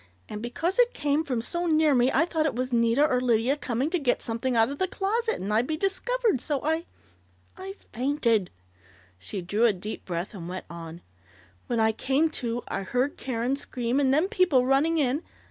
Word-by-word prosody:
and 210 Hz, -, -6 dB
because 330 Hz, -, -2 dB
it -, -, +4 dB
came 295 Hz, +1 st, +1 dB
from 250 Hz, -7 st, -2 dB
so 345 Hz, +7 st, -1 dB
near 310 Hz, -2 st, +4 dB
me 250 Hz, 0 st, +3 dB
I 325 Hz, -, +3 dB
thought 320 Hz, -3 st, 0 dB
it 280 Hz, -, -2 dB
was 255 Hz, +1 st, -2 dB
Nita 235 Hz, +4 st, +3 dB
or 250 Hz, -3 st, +1 dB
Lydia 240 Hz, +2 st, +2 dB
coming 265 Hz, +1 st, -2 dB
to 360 Hz, -, +1 dB
get 255 Hz, -5 st, +1 dB
something 235 Hz, +2 st, -2 dB
out 225 Hz, +1 st, +4 dB
of 280 Hz, -, -6 dB
the 375 Hz, -, +1 dB
closet, 445 Hz, +5 st, -1 dB
and 200 Hz, +3 st, -3 dB
I'd 230 Hz, +4 st, +2 dB
be 315 Hz, -, -2 dB
discovered, 415 Hz, -, 0 dB
so 285 Hz, +1 st, -1 dB
I 320 Hz, +2 st, 0 dB, 0.7 s
I 385 Hz, +1 st, -8 dB, 0.2 s
fainted 235 Hz, -, +1 dB, 0.4 s
" -, -, -27 dB, 0.3 s
She 185 Hz, -, -6 dB
drew 205 Hz, +6 st, +1 dB
a 225 Hz, -, +4 dB
deep 200 Hz, +4 st, -7 dB
breath 175 Hz, +2 st, -4 dB
and 175 Hz, -4 st, -7 dB
went 185 Hz, +1 st, -6 dB
on: 170 Hz, 0 st, -8 dB, 0.7 s
"When 235 Hz, -, 0 dB
I 220 Hz, 0 st, +4 dB
came 275 Hz, +8 st, +1 dB
to 240 Hz, 0 st, -2 dB
I -, -, -3 dB
heard 250 Hz, +8 st, -1 dB
Karen 250 Hz, +1 st, -2 dB
scream, 250 Hz, -2 st, -2 dB
and 270 Hz, -2 st, +3 dB
then 310 Hz, +7 st, +3 dB
people 365 Hz, -, +3 dB
running 285 Hz, +5 st, +2 dB
in 280 Hz, 0 st, +1 dB
260 Hz, 205 wpm, -26 LUFS, 230-315 Hz, 0.7 s, it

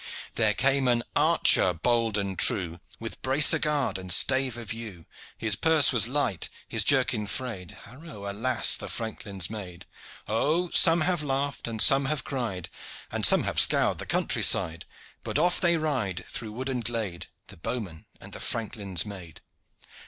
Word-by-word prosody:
There 110 Hz, -2 st, +1 dB
came 135 Hz, 0 st, +1 dB
an 120 Hz, -1 st, +1 dB
archer 90 Hz, -, +4 dB
bold 115 Hz, +4 st, 0 dB
and 100 Hz, -2 st, -3 dB
true, 85 Hz, -2 st, +2 dB, 0.2 s
With 115 Hz, 0 st, -7 dB
bracer 145 Hz, +4 st, +4 dB
guard 150 Hz, -10 st, -1 dB
and 95 Hz, -1 st, -6 dB
stave 130 Hz, +3 st, +4 dB
of 115 Hz, -3 st, -5 dB
yew; 105 Hz, -8 st, -9 dB, 0.3 s
His 110 Hz, -2 st, +1 dB
purse 160 Hz, +1 st, +3 dB
was 115 Hz, -2 st, +3 dB
light, 130 Hz, -, -1 dB, 0.2 s
his -, -, 0 dB
jerkin 105 Hz, -1 st, +1 dB
frayed; 100 Hz, -5 st, -5 dB
Haro, 125 Hz, -4 st, -11 dB
alas! 110 Hz, +6 st, +2 dB
the -, -, -7 dB
franklin's 100 Hz, -5 st, -5 dB
maid! 95 Hz, -6 st, -9 dB, 0.4 s
Oh, 160 Hz, +11 st, -1 dB
some 165 Hz, -1 st, +5 dB
have 175 Hz, 0 st, 0 dB
laughed 140 Hz, -1 st, -3 dB
and 115 Hz, -1 st, -6 dB
some 135 Hz, +4 st, +6 dB
have 145 Hz, 0 st, -2 dB
cried 115 Hz, -, -5 dB, 0.4 s
And -, -, +4 dB
some -, -, +4 dB
have -, -, -1 dB
scoured -, -, +3 dB
the -, -, -7 dB
country -, -, 0 dB
side! 80 Hz, 0 st, +2 dB, 0.4 s
But -, -, -2 dB
off 175 Hz, +3 st, +1 dB
they 170 Hz, -2 st, +2 dB
ride 130 Hz, -, -3 dB
through 110 Hz, -2 st, -7 dB
wood 130 Hz, +4 st, -6 dB
and 125 Hz, -3 st, -3 dB
glade, 110 Hz, -7 st, -5 dB, 0.2 s
The -, -, -12 dB
bowman 90 Hz, -3 st, -6 dB
and -, -, -12 dB
the -, -, -8 dB
franklin's 105 Hz, -5 st, -3 dB
maid. 95 Hz, -6 st, -10 dB
115 Hz, 165 wpm, -26 LUFS, 100-135 Hz, 0.4 s, some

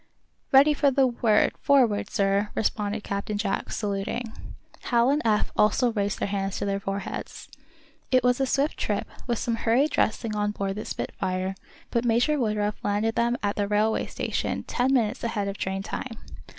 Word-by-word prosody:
"Ready 280 Hz, +3 st, +7 dB
for 285 Hz, -1 st, +3 dB
the 270 Hz, 0 st, +3 dB
word, 235 Hz, -4 st, +3 dB
'forward,' 240 Hz, -8 st, +3 dB
sir," 200 Hz, +1 st, +1 dB
responded 210 Hz, 0 st, -1 dB
Captain 200 Hz, +1 st, -3 dB
Jack, 200 Hz, -2 st, -2 dB
saluting. 210 Hz, +3 st, -3 dB, 0.5 s
Hal 240 Hz, +1 st, +3 dB
and 295 Hz, +2 st, +1 dB
Eph 215 Hz, -2 st, +1 dB
also 235 Hz, +3 st, +3 dB
raised 205 Hz, -2 st, -1 dB
their -, -, -1 dB
hands 195 Hz, -1 st, -2 dB
to -, -, -2 dB
their 200 Hz, 0 st, -1 dB
foreheads. 195 Hz, 0 st, -5 dB, 0.6 s
It 255 Hz, -1 st, +3 dB
was 250 Hz, +1 st, +3 dB
a 270 Hz, -, +2 dB
swift 280 Hz, +4 st, 0 dB
trip, -, -, -1 dB, 0.2 s
with 240 Hz, -2 st, 0 dB
some 230 Hz, +1 st, -1 dB
hurried 245 Hz, +7 st, +2 dB
dressing 220 Hz, 0 st, 0 dB
on 210 Hz, 0 st, 0 dB
board 195 Hz, -1 st, -2 dB
the 210 Hz, +2 st, -6 dB
"Spitfire," 185 Hz, +1 st, -3 dB, 0.4 s
but 235 Hz, -, +1 dB
Major 245 Hz, +6 st, +2 dB
Woodruff 210 Hz, -3 st, -1 dB
landed 210 Hz, +2 st, 0 dB
them 235 Hz, +1 st, +1 dB
at 205 Hz, 0 st, -1 dB
the 205 Hz, -1 st, 0 dB
railway 210 Hz, +2 st, +1 dB
station -, -, -2 dB
ten 250 Hz, +2 st, 0 dB
minutes 240 Hz, -2 st, +1 dB
ahead 210 Hz, -3 st, -1 dB
of 200 Hz, 0 st, -5 dB
train 190 Hz, 0 st, -2 dB
time. 225 Hz, +2 st, -5 dB
215 Hz, 175 wpm, -26 LUFS, 200-245 Hz, 0.6 s, Ready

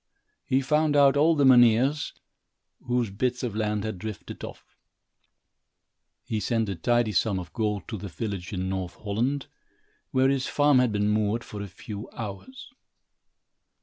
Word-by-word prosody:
He 130 Hz, +1 st, +1 dB
found 150 Hz, +2 st, +2 dB
out 140 Hz, -1 st, +6 dB
all 160 Hz, +3 st, +4 dB
the 145 Hz, -2 st, +3 dB
mynheers, 125 Hz, +3 st, +5 dB, 0.7 s
whose 120 Hz, -4 st, 0 dB
bits 125 Hz, +5 st, -1 dB
of 115 Hz, -4 st, -3 dB
land 105 Hz, -1 st, -1 dB
had 110 Hz, -4 st, -4 dB
drifted 110 Hz, -1 st, -7 dB
off. -, -, -10 dB, 1.5 s
He 110 Hz, -, -2 dB
sent 115 Hz, 0 st, 0 dB
a 95 Hz, -, -2 dB
tidy 120 Hz, +6 st, +1 dB
sum 100 Hz, +2 st, +1 dB
of 85 Hz, -3 st, -7 dB
gold 105 Hz, -3 st, -2 dB
to 110 Hz, -, -5 dB
the 100 Hz, -, -6 dB
village 95 Hz, +1 st, -5 dB
in 95 Hz, -2 st, -3 dB
North 95 Hz, -2 st, -3 dB
Holland, 120 Hz, +7 st, -2 dB, 0.6 s
where 130 Hz, 0 st, +3 dB
his 135 Hz, -1 st, 0 dB
farm 145 Hz, -2 st, +4 dB
had 125 Hz, -2 st, +2 dB
been 105 Hz, 0 st, 0 dB
moored, 105 Hz, +2 st, +1 dB
for 105 Hz, -, -8 dB
a 100 Hz, -, -5 dB
few 105 Hz, +4 st, -8 dB
hours. 115 Hz, -, -8 dB
110 Hz, 155 wpm, -26 LUFS, 100-130 Hz, 1.5 s, out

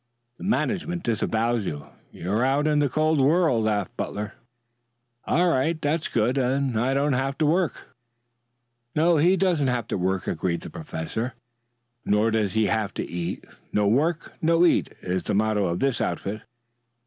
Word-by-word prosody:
"The -, -, -9 dB
management 180 Hz, -4 st, -1 dB
disowns 115 Hz, -1 st, 0 dB
you. 75 Hz, -1 st, -5 dB, 0.3 s
You're 105 Hz, +7 st, -1 dB
out 135 Hz, +3 st, +2 dB
in 150 Hz, -1 st, +3 dB
the 145 Hz, -1 st, +2 dB
cold 155 Hz, +2 st, +2 dB
world," 150 Hz, -5 st, +3 dB
laughed 105 Hz, -4 st, -1 dB
Butler. 105 Hz, 0 st, -4 dB, 0.9 s
"All 180 Hz, +2 st, +2 dB
right. 155 Hz, +5 st, +1 dB
That's 150 Hz, +2 st, 0 dB
good. 120 Hz, +4 st, +1 dB
Then 135 Hz, 0 st, +1 dB
I 125 Hz, +5 st, +1 dB
don't 140 Hz, +1 st, +2 dB
have 135 Hz, +2 st, -1 dB
to 155 Hz, -, +2 dB
work." 160 Hz, -4 st, -1 dB, 1.0 s
"No, 165 Hz, +2 st, +4 dB
he 175 Hz, +6 st, +4 dB
doesn't 170 Hz, -7 st, +2 dB
have 125 Hz, -3 st, -1 dB
to -, -, -1 dB
work," 95 Hz, +1 st, 0 dB
agreed 85 Hz, -2 st, -1 dB
the -, -, -9 dB
professor. 110 Hz, +9 st, -4 dB, 0.7 s
"Nor 105 Hz, +2 st, +2 dB
does 110 Hz, -4 st, 0 dB
he 110 Hz, -1 st, +2 dB
have 105 Hz, 0 st, -1 dB
to -, -, -3 dB
eat. 85 Hz, +1 st, -4 dB, 0.3 s
No 105 Hz, -1 st, +2 dB
work, 155 Hz, +9 st, +1 dB
no 165 Hz, +2 st, +4 dB
eat, 170 Hz, -, +2 dB
is 90 Hz, 0 st, -1 dB
the 105 Hz, -, -2 dB
motto 105 Hz, -1 st, +2 dB
of 85 Hz, +1 st, -2 dB
this 135 Hz, -2 st, +1 dB
outfit." 105 Hz, +2 st, -3 dB
125 Hz, 165 wpm, -25 LUFS, 105-155 Hz, 1.0 s, No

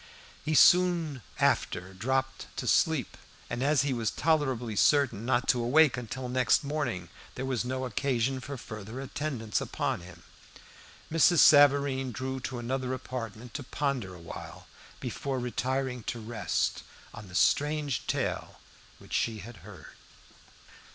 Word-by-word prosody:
He 155 Hz, 0 st, 0 dB
soon 170 Hz, -4 st, +5 dB, 0.2 s
after 90 Hz, +2 st, +1 dB
dropped 130 Hz, +7 st, -2 dB, 0.2 s
asleep, -, -, +2 dB, 0.4 s
and 120 Hz, +1 st, -2 dB
as 140 Hz, -1 st, +3 dB
he 140 Hz, -2 st, 0 dB
was 115 Hz, -3 st, 0 dB
tolerably 130 Hz, -8 st, 0 dB
certain 120 Hz, -3 st, +3 dB
not 125 Hz, 0 st, +1 dB
to 125 Hz, -, +3 dB
awake 145 Hz, +3 st, +5 dB
until 125 Hz, +1 st, -5 dB
next 130 Hz, +3 st, +2 dB
morning, 130 Hz, -, -3 dB, 0.3 s
there 130 Hz, -, -4 dB
was 130 Hz, -3 st, -1 dB
no 130 Hz, +1 st, -3 dB
occasion 130 Hz, 0 st, 0 dB
for 140 Hz, +2 st, -7 dB
further 110 Hz, +1 st, -8 dB
attendance 135 Hz, -5 st, -3 dB
upon -, -, -2 dB
him. 90 Hz, -1 st, -13 dB, 0.9 s
Mrs. 165 Hz, +2 st, +5 dB
Savareen 140 Hz, -3 st, +5 dB
drew 130 Hz, +3 st, -4 dB
to 125 Hz, 0 st, -5 dB
another 130 Hz, +2 st, -2 dB
apartment 120 Hz, -3 st, -7 dB
to -, -, -4 dB
ponder 130 Hz, -8 st, -2 dB
a -, -, -12 dB
while, 85 Hz, -, -9 dB, 0.3 s
before 135 Hz, -2 st, -3 dB
retiring 125 Hz, +1 st, -2 dB
to 120 Hz, -, -3 dB
rest, 115 Hz, +1 st, -1 dB, 0.3 s
on 110 Hz, -3 st, -10 dB
the 90 Hz, -, -11 dB
strange 145 Hz, -1 st, +1 dB
tale -, -, -2 dB, 0.4 s
which -, -, -13 dB
she 115 Hz, -2 st, 0 dB
had 110 Hz, +3 st, -10 dB
heard. -, -, -12 dB
130 Hz, 140 wpm, -29 LUFS, 115-140 Hz, 0.9 s, soon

